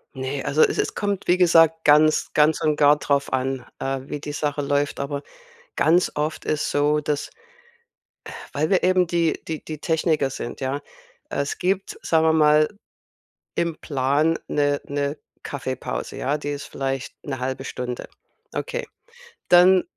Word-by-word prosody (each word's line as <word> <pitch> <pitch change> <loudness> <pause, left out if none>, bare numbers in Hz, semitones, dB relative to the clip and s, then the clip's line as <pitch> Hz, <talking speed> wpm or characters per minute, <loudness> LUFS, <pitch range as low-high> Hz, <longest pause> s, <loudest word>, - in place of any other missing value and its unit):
Ne, 130 +1 -3
also 155 +2 +1
es - - +2
es - - 0
kommt, 205 -2 -2
wie 180 +1 +4
gesagt, 165 -2 +4
ganz 155 +1 +4
ganz 150 +1 +3
und 155 -1 +2
gar 145 0 +5
drauf 140 -1 0
an, 130 -1 -1
äh, 135 0 -2
wie 145 +2 -6
die 145 0 -6
Sache 145 -1 -1
läuft. 145 +1 0
Aber 140 +1 -3 0.5
ganz 175 +3 +3
oft 150 +1 -2
ist 155 -1 -1
so, 145 +1 +2
dass, 150 -1 -2 0.9
äh, - - -9 0.2
weil 155 +2 0
wir 190 - +3
eben 185 0 +4
die 170 -1 0
die 160 -2 -4
die 155 -2 -7
Techniker 155 -3 +1
sind, 120 +1 -6
ja. 135 +2 -2 0.5
Es 140 0 -2
gibt, 190 +1 -1
sagen 160 -1 +2
wir 160 - +4
mal, 150 -1 +5 0.9
im 170 -2 -1
Plan 145 +3 +1
'ne 145 -1 +1
'ne 145 +1 -2 0.3
Kaffeepause, 130 -2 -4
ja, 145 +3 0
die 145 - -4
ist 145 0 -4
vielleicht 135 -1 -4
'ne 135 -3 -4
0,5 130 +1 -3
Stunde. 125 -1 -5 0.5
Okay. - - -3 0.6
Dann 180 +1 +7
150 Hz, 160 wpm, -23 LUFS, 140-160 Hz, 0.9 s, Dann